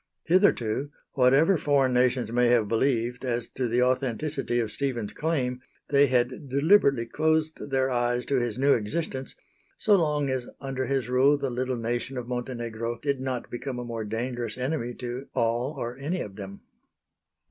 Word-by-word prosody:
Hitherto, 145 - +2 0.2
whatever 140 +7 +4
foreign 140 -3 +2
nations 125 -1 +2
may 125 +1 +3
have 120 -3 +3
believed 120 +1 0
as 120 -2 -1
to 130 -2 -2
the 120 +2 +2
authenticity 130 +1 0
of 110 -2 -1
Stephen's 125 -7 -2
claim, 130 -6 -1 0.3
they 140 0 +5
had 130 +2 0
deliberately 140 - +4
closed 155 +3 0
their 135 -1 +1
eyes 120 0 0
to 140 - +1
his 120 -2 -2
new 140 +2 +4
existence, 130 +4 -3 0.4
so 210 -2 +4
long 150 -5 +1
as 130 -2 -2
under 135 -1 -3
his 135 -3 0
rule 130 +3 +4
the 140 -2 -2
little 125 +1 -2
nation 120 +3 -3
of 120 -1 -5
Montenegro 120 -2 -4
did 140 -2 -1
not 130 -2 -4
become 125 +1 -4
a 120 - -5
more 115 -2 -4
dangerous 120 +3 -3
enemy 125 -2 -2
to 125 +2 -6
all 120 +5 0
or 120 +1 -4
any 150 +7 -3
of 100 -2 -7
them. 100 -1 -8
125 Hz, 165 wpm, -27 LUFS, 120-140 Hz, 0.4 s, they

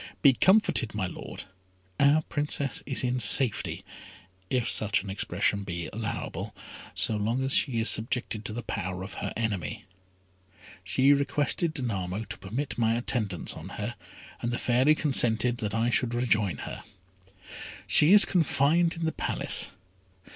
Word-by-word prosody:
Be 140 -3 +7
comforted, 185 - +2
my 105 -3 -1
Lord; 90 - -8 0.6
our 145 +3 +4
Princess 145 -3 -2
is 135 -2 +1
in 125 0 0
safety, 120 +1 +3 0.6
if 125 -3 0
such 105 -5 0
an 100 - -6
expression 100 +1 -1
be 85 -3 -5
allowable, 110 0 -4 0.4
so 110 - 0
long 115 +5 -1
as 135 +1 0
she 125 -5 +1
is 110 - +2
subjected 110 -1 0
to - - -3
the 120 +2 -5
power 95 -4 -4
of 95 0 -8
her - - -3
enemy. 100 -8 -3 1.0
She 130 +8 +3
requested 145 +3 0
Danamo 105 - -3
to - - -6
permit 120 +8 -5
my 115 0 +2
attendance 110 -6 -3
on - - -9
her, - - -4 0.5
and 120 - -2
the 120 - -1
Fairy 130 +6 +3
consented 120 -5 +2
that 110 -3 -3
I 115 +2 +1
should 120 0 +1
rejoin 105 - +1
her. - - -7 1.0
She 150 +4 +5
is 205 0 +10
confined 165 0 +2
in 165 0 -4
the 160 - 0
Palace. - - -2
120 Hz, 150 wpm, -27 LUFS, 105-140 Hz, 1.0 s, is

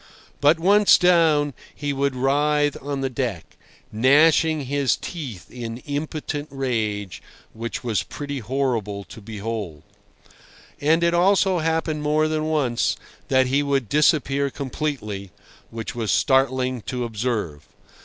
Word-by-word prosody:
But, 150 +3 +4
once 200 +4 +6
down, 160 -5 +3 0.2
he 145 -1 -3
would 140 -1 0
writhe 145 +2 +2
on 140 0 -3
the 135 - -1
deck, 115 - -4 0.4
gnashing 150 +6 +4
his 140 -1 +1
teeth 135 - -7
in 115 -2 -6
impotent 145 0 -4
rage—which 115 -2 -4
was 115 -4 0
pretty 145 -1 -6
horrible 115 -5 -2
to 110 - -12
behold. 105 -7 -5 1.0
And 160 +4 +2
it 170 0 +3
also 190 +1 +3
happened 160 -1 -1
more 155 +1 +2
than 155 0 -1
once 145 -7 +1 0.3
that 130 0 +3
he 135 +3 +1
would 140 -6 0
disappear 140 -1 +2
completely—which 115 - -6
was 115 -4 -2
startling 130 -2 +2
to 125 -1 -2
observe. 110 -10 -3
135 Hz, 120 wpm, -23 LUFS, 115-150 Hz, 1.0 s, once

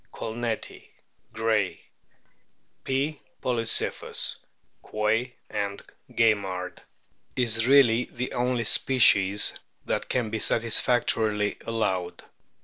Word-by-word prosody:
colneti, 115 0 -5 0.4
Gray; 105 -6 -1 1.0
P. 140 +3 -2 0.2
polycyphus, 115 -3 -1 0.5
Ouoy 110 +4 -1 0.2
and 100 -1 -4 0.3
Gaimard), 100 -5 0 0.6
is 115 -2 +1
really 125 -3 +5
the 125 +1 -6
only 125 -1 -1
species 105 -5 +4 0.3
that - - -3
can 120 -4 -1
be 110 - -2
satisfactorily 110 -2 +2
allowed. 95 -6 -2
115 Hz, 80 wpm, -26 LUFS, 105-120 Hz, 1.0 s, really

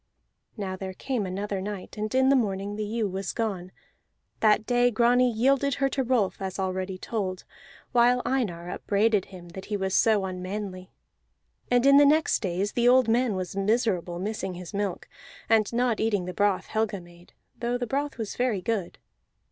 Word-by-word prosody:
Now 190 -3 -3
there 190 0 -6
came 245 -5 -2
another 195 +1 -3
night, 200 -1 -6
and 215 +2 -3
in 260 0 +4
the 275 - +5
morning 200 -4 -1
the 215 - -3
ewe 215 +1 -1
was 190 0 -4
gone; 195 -6 -3 0.7
that 215 0 +3
day 245 +1 +3
Grani 245 +2 +3
yielded 270 +4 +2
her 275 0 +1
to 270 - -1
Rolf, 235 -7 0
as 190 -1 -4
already 190 0 -2
told, 185 -3 -3 0.5
while 245 +1 +4
Einar 180 -10 -1
upbraided 205 -1 +1
him 180 -3 -12
that 190 +3 -9
he 210 - -2
was 190 -1 -2
so 215 -3 +3
unmanly. 185 0 -5 0.8
And 245 +1 +3
in 275 0 +7
the 290 - +7
next 310 +2 +3
days 195 +1 -2
the 240 0 +1
old 255 -1 +5
man 235 -2 +2
was 185 0 -4
miserable, 195 -4 0
missing 195 -1 -3
his 180 -1 -9
milk, 200 -2 -3 0.4
and 220 -2 +3
not 240 -1 +1
eating 205 -5 0
the 180 - -5
broth 200 0 +1
Helga 215 -2 -1
made, 175 0 -17 0.3
though 240 +1 -1
the 245 - -2
broth 280 +3 -2
was 220 -3 -4
very 240 -7 0
good. 210 -5 -2
210 Hz, 180 wpm, -26 LUFS, 190-240 Hz, 0.8 s, in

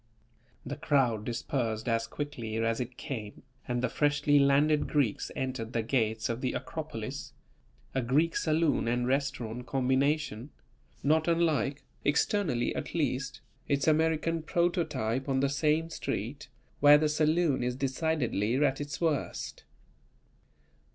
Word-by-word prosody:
The 145 +3 -5
crowd 135 -8 +1
dispersed 115 -1 -2
as 115 -1 +1
quickly 125 -7 -5
as 115 0 0
it 125 0 -5
came 110 -6 -6 0.2
and 120 0 -1
the - - +3
freshly 145 0 +2
landed 145 +2 +3
Greeks 140 -9 0
entered 130 -3 -3
the 115 - 0
gates 110 -2 0
of 115 +1 -3
the 130 - -1
"Acropolis," - - -5 0.6
a 130 - +1
Greek 150 +7 +2
saloon 160 -5 +1
and 120 +1 +1
restaurant 125 -3 -2
combination, 135 0 0 0.5
not 155 +3 +3
unlike 160 -4 +1 0.2
(externally 145 - +1
at - - -5
least) 135 -4 -1 0.3
its 140 0 +1
American 160 +1 +2
prototype 155 - 0
on 135 -1 +2
the 140 +1 +2
same 155 +3 +1
street, 125 +4 -4 0.3
where 145 0 +8
the 155 +1 +2
saloon 155 -1 +2
is 125 0 -1
decidedly 130 -5 0
at 135 0 +2
its 145 0 -5
worst. 160 -5 -2
140 Hz, 130 wpm, -30 LUFS, 120-150 Hz, 0.6 s, where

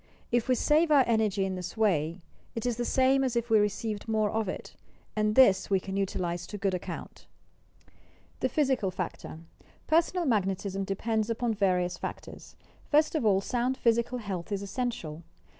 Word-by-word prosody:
If 240 0 +1
we 255 - +3
save 310 +6 +3
our 280 -4 +6
enei^y 215 -4 +1
in 190 - -2
this 185 +3 -6
way, 170 -5 +1 0.3
it 230 - -3
is 240 -2 0
the 240 - -1
same 265 +2 +3
as 255 -2 -1
if 235 0 -1
we 220 - +6
received 210 +1 -2
more 215 -2 +1
of 220 -3 -1
it, - - -7 0.4
and 215 0 +1
this 200 -8 +5
we 195 -1 +3
can 190 +1 -6
utilize 180 -3 -2
to 205 - -6
good 195 -1 0
account. 180 - -6 1.1
THE 260 - 0
PHYSICAL 260 -7 +1
FACTOR 180 -3 -6 0.4
Personal 340 +2 +2
Magnetism 195 -4 0
depends 220 +3 -1
upon 230 0 0
various 180 -3 0
factors. - - -8 0.3
First 305 +1 +3
of 300 -9 +1
all 195 -2 +4
sound 250 +4 -1
physical 235 +1 +1
health 200 -5 -5
is 200 0 -2
essential. 200 -8 -4
215 Hz, 170 wpm, -29 LUFS, 195-245 Hz, 1.1 s, our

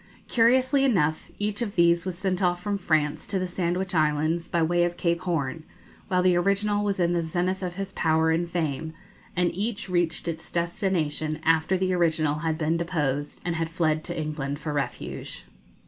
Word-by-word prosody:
Curiously 255 +4 +4
enough, 160 - +1
each 205 +2 -2
of 215 -4 -3
these 170 0 +4
was 180 -2 -3
sent 185 0 -1
off 175 -1 +2
from 205 -1 -1
France 155 -5 0
to 195 - 0
the 185 0 -1
Sandwich 180 +1 -2
Islands, 155 +1 +1
by 170 -1 +1
way 175 +2 +2
of 175 0 -1
Cape 170 0 0
Horn, 160 -5 -2 0.5
while 185 -2 +2
the 180 -1 +4
original 200 +3 +1
was 200 -2 -1
in 175 0 +2
the 170 - +1
zenith 180 +3 -1
of 180 -2 -4
his 195 0 -4
power 160 0 +2
and 170 +1 0
fame; 160 -2 -2 0.4
and 180 -1 +1
each 210 +2 -3
reached 175 -2 0
its 160 -1 -5
destination 170 -3 -1
after 165 +3 +3
the 185 0 0
original 160 -4 +1
had 160 0 -1
been 160 +1 +1
deposed 150 -5 -2
and 170 -2 -1
had 165 0 -1
fled 155 -2 0
to - - -4
England 150 -2 -3
for 150 0 -4
refuge. 135 -4 -4
170 Hz, 185 wpm, -26 LUFS, 160-185 Hz, 0.5 s, Curiously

